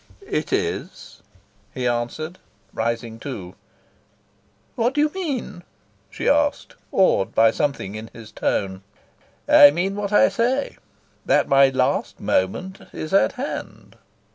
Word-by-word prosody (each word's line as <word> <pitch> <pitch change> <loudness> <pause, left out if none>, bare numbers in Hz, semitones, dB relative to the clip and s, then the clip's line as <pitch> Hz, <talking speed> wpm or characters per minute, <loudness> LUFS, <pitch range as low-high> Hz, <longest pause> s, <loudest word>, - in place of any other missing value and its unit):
"It - - -3
is," - - -3 0.5
he 130 -2 -3
answered, 120 +9 -3 0.3
rising 115 0 -3
too. 100 -10 -7 1.2
"What 240 +3 0
do 295 - +3
you 300 0 +2
mean?" 280 - -4 0.5
she - - -5
asked, 290 0 +1 0.2
awed 185 - +2
by 115 0 +5
something 135 -8 -2
in 110 +1 -7
his 115 -2 -12
tone. 95 -1 -2 0.7
"I 145 - +9
mean 180 +6 -1
what 205 0 -3
I 240 +6 +5
say: 255 +4 -1 0.5
that - - +3
my 135 0 +5
last 130 - -1
moment 180 - -1
is 155 +3 -6
at 195 - +4
hand." 270 +3 -7
155 Hz, 125 wpm, -22 LUFS, -, 1.2 s, I